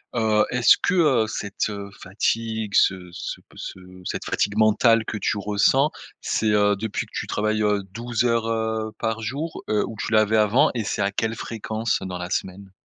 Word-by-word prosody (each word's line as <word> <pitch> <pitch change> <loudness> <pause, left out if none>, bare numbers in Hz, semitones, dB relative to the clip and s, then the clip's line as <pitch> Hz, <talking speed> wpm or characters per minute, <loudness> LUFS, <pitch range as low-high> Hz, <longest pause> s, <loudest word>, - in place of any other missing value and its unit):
Heu, 110 -2 +3
est-ce 125 -1 +5
que 180 - +1
heu, 135 -10 +3
cette 100 0 -3 0.3
fatigue 110 +2 -2
ce 90 -2 +2
ce - - -5
p - - -24
ce 95 - -7 0.2
cette - - -4
fatigue 105 +1 -1
mentale 110 +1 +4
que 110 - -4
tu 105 - -1
ressens, 105 +8 +2 0.3
c'est 110 - 0
heu, 105 0 +3
depuis 105 +1 -3
que - - -24
tu - - -4
travailles 110 +1 0
heu 105 -1 +1
12 120 +1 -2
heures, 115 -1 +1
heu, 110 -1 -1
par 115 0 -2
jour, 145 +9 -4
heu, 105 -1 +2
où 115 - -7
tu - - -3
l'avais 110 0 +4
avant 105 +4 +4
et 115 -3 -2
c'est 100 - -1
à 100 - 0
quelle 110 +2 -1
fréquence 110 0 -2
dans 95 -1 -5
la 90 +1 -6
semaine? 95 +1 -4
110 Hz, 190 wpm, -23 LUFS, 105-115 Hz, 0.3 s, est-ce